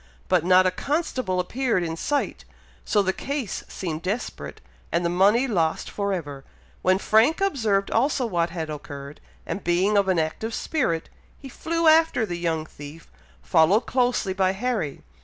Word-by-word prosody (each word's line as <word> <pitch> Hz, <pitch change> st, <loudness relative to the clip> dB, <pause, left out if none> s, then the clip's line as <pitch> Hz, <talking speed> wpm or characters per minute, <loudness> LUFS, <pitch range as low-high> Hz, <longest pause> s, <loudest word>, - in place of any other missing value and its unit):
but 180 Hz, -4 st, +3 dB
not 185 Hz, +1 st, +5 dB
a 185 Hz, -, +3 dB
constable 255 Hz, -, -2 dB
appeared 225 Hz, +1 st, 0 dB
in 165 Hz, -1 st, -3 dB
sight, 285 Hz, -, -2 dB, 0.4 s
so 205 Hz, -2 st, +2 dB
the 190 Hz, 0 st, 0 dB
case 275 Hz, -5 st, -4 dB
seemed 165 Hz, -4 st, -5 dB
desperate, 200 Hz, +7 st, -4 dB, 0.3 s
and 170 Hz, +1 st, 0 dB
the -, -, +2 dB
money 205 Hz, +8 st, +4 dB
lost 165 Hz, -9 st, 0 dB
for 200 Hz, -1 st, -2 dB
ever, 145 Hz, -7 st, -4 dB, 0.4 s
when 185 Hz, 0 st, +3 dB
Frank 220 Hz, +10 st, +3 dB
observed 225 Hz, -, +1 dB
also 260 Hz, +2 st, +1 dB
what 170 Hz, -6 st, 0 dB
had 165 Hz, -2 st, -4 dB
occurred, 140 Hz, -1 st, -8 dB, 0.2 s
and 200 Hz, -, -4 dB
being 180 Hz, +4 st, +2 dB
of 200 Hz, -1 st, +3 dB
an 185 Hz, -2 st, +2 dB
active 165 Hz, +8 st, -2 dB
spirit, 205 Hz, -, -1 dB, 0.3 s
he 275 Hz, -, -11 dB
flew 330 Hz, +5 st, -1 dB
after 315 Hz, -7 st, +5 dB
the 175 Hz, -4 st, -5 dB
young 165 Hz, -2 st, -1 dB
thief, 150 Hz, +1 st, -12 dB, 0.3 s
followed 160 Hz, -, +4 dB
closely 245 Hz, -6 st, 0 dB
by 190 Hz, 0 st, +1 dB
Harry. 210 Hz, -, -3 dB
190 Hz, 160 wpm, -24 LUFS, 170-245 Hz, 0.4 s, not